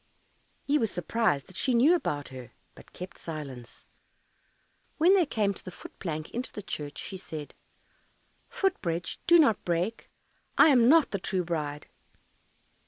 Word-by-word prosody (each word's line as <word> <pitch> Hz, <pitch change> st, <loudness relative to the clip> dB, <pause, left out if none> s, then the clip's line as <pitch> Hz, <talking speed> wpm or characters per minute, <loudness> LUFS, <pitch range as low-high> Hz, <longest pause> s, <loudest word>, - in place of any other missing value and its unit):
He 295 Hz, +1 st, +2 dB
was 225 Hz, -, +1 dB
surprised 175 Hz, -6 st, 0 dB
that 185 Hz, -, -15 dB
she 255 Hz, +4 st, +1 dB
knew 270 Hz, +9 st, +6 dB
about 145 Hz, -, -1 dB
her, 130 Hz, -2 st, -10 dB, 0.2 s
but -, -, -17 dB
kept 180 Hz, 0 st, -9 dB
silence. 140 Hz, -7 st, -8 dB, 1.1 s
When 345 Hz, +5 st, +5 dB
they 365 Hz, -6 st, +4 dB
came 210 Hz, -6 st, 0 dB
to -, -, -10 dB
the -, -, -7 dB
foot 180 Hz, -, -13 dB
plank 155 Hz, -3 st, -4 dB
into 245 Hz, +2 st, -4 dB
the 210 Hz, -, -7 dB
churchyard, 145 Hz, -6 st, -6 dB
she 190 Hz, -, -5 dB
said, 155 Hz, -5 st, -8 dB, 1.0 s
"Foot 385 Hz, -2 st, 0 dB
bridge, 170 Hz, 0 st, -3 dB
do 345 Hz, -, +8 dB
not 275 Hz, -, +4 dB
break, 175 Hz, +6 st, -2 dB, 0.5 s
I -, -, +8 dB
am 245 Hz, -4 st, +5 dB
not 320 Hz, 0 st, +5 dB
the 200 Hz, -, -1 dB
true 185 Hz, 0 st, -1 dB
bride." 150 Hz, -4 st, -3 dB
185 Hz, 160 wpm, -28 LUFS, 155-250 Hz, 1.1 s, do